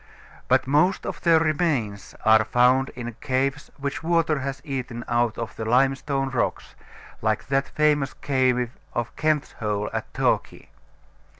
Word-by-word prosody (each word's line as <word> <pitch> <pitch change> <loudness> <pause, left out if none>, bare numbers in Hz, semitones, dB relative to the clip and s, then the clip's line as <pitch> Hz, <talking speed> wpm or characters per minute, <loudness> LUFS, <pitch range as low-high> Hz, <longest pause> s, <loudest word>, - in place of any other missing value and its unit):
But - - +3
most 150 +8 +2
of - - -5
their 165 -2 +5
remains 150 - -1
are 110 -1 +6
found 125 +4 +3
in 120 -1 -6
caves 135 +1 -1
which 140 0 -4
water 165 -2 +1
has 135 0 -4
eaten 125 -4 -4
out 120 -2 +1
of 115 -1 -5
the 110 - -5
limestone 135 +3 +1
rocks, 125 - -2 0.5
like 110 0 0
that 135 0 +1
famous 150 -2 +1
cave 130 -3 +1 0.2
of 120 -1 -3
Kent's 155 -1 0
Hole 105 -1 -3
at - - -4
Torquay. - - -1
135 Hz, 140 wpm, -24 LUFS, 120-145 Hz, 0.5 s, are